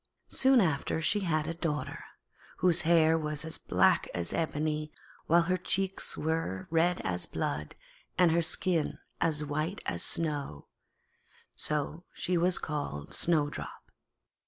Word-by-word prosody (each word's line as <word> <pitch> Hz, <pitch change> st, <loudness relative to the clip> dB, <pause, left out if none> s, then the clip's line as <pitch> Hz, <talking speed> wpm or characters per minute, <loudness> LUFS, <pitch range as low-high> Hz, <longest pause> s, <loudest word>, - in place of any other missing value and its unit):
Soon 265 Hz, -1 st, +5 dB
after, 160 Hz, -3 st, 0 dB
she 205 Hz, +6 st, +2 dB
had 155 Hz, -5 st, 0 dB
a 165 Hz, -, -3 dB
daughter, 165 Hz, -3 st, -3 dB, 0.5 s
whose 175 Hz, -1 st, +3 dB
hair 165 Hz, -1 st, +4 dB
was 150 Hz, +1 st, -4 dB
black -, -, +3 dB
as 85 Hz, -1 st, -2 dB
ebony, 155 Hz, -1 st, -1 dB, 0.4 s
while 170 Hz, +1 st, +5 dB
her 185 Hz, +2 st, +1 dB
cheeks 190 Hz, +1 st, -1 dB
were 160 Hz, -, -2 dB
red 170 Hz, +2 st, +2 dB
as 90 Hz, -2 st, -2 dB
blood, 75 Hz, +1 st, -3 dB, 0.4 s
and 180 Hz, -2 st, +5 dB
her 170 Hz, +1 st, +3 dB
skin 165 Hz, 0 st, 0 dB, 0.2 s
as 155 Hz, -3 st, +1 dB
white 155 Hz, +7 st, -3 dB
as 85 Hz, -, -2 dB
snow; 145 Hz, -, -1 dB, 0.9 s
so 150 Hz, +3 st, -2 dB
she 180 Hz, -, -1 dB
was 175 Hz, +1 st, +4 dB
called 145 Hz, -, -4 dB
Snowdrop. 150 Hz, -4 st, -1 dB
160 Hz, 130 wpm, -30 LUFS, 150-170 Hz, 0.9 s, Soon